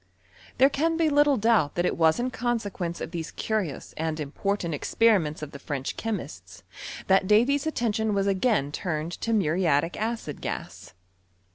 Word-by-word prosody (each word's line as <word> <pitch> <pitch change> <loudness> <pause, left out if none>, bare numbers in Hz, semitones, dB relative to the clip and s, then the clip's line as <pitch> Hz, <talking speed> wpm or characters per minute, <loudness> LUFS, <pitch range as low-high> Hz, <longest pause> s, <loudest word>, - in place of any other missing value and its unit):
There 265 - +7
can 325 +4 +1
be 325 -2 +3
little 290 -1 +4
doubt 220 -9 +2
that 175 - +1
it - - +1
was 160 +2 +3
in 255 +1 -1
consequence 205 -8 -3
of - - -5
thesa 165 -2 -5
curious 210 -10 -3
and 160 0 -2
important 170 +4 -2
experiments 165 -2 +2
of 150 - -6
the 140 - -9
French 140 -2 -4
chemists 225 -2 -6 0.4
that 190 0 +3
Davy's 260 +8 +3
attention 220 -7 0
was 195 0 +1
again 195 - +1
turned 155 0 -3
to - - -3
mnriatic 170 -5 +2
acid 220 -9 -4
gas. - - -6
200 Hz, 155 wpm, -26 LUFS, 160-230 Hz, 0.4 s, There